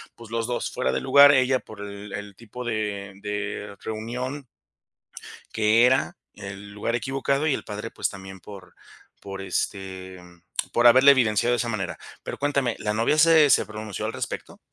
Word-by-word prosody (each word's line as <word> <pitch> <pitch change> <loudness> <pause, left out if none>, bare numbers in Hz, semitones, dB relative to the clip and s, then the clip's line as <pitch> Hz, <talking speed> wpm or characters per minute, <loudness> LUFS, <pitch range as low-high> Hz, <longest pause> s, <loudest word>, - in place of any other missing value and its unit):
pues 115 -1 -13
los 115 -1 -1
2 120 -1 -2
fuera 125 - -1
de - - -1
lugar, 140 +2 +7
ella 130 -1 +3
por 110 -4 -12
el 100 0 -8
el 105 -1 -7
tipo 120 +4 -9
de 105 -3 -3
de 105 0 -5
reunión 125 +5 -5 1.1
que 115 +2 +4
era 130 +1 +1 0.2
el 100 +1 -9
lugar 105 +3 -3
equivocado, 135 +4 -1
y 150 - +2
el - - -5
padre, 105 0 -6
pues - - -2
también 95 -1 -10
por 95 -1 -12 0.5
por, 95 -1 -7
este, 95 -1 -4 0.5
por 120 +1 +4
haberle 130 +4 +8
evidenciado 120 -3 +3
de - - +1
esa 120 -1 -2
manera. 100 -5 -4 0.2
Pero - - -6
cuéntame, 140 -4 0
¿la 105 0 -2
novia 115 +8 +1
se 155 -2 +6
se - - +4
pronunció 105 -1 -5
al - - -3
respecto? - - -6
110 Hz, 170 wpm, -25 LUFS, 100-130 Hz, 1.1 s, haberle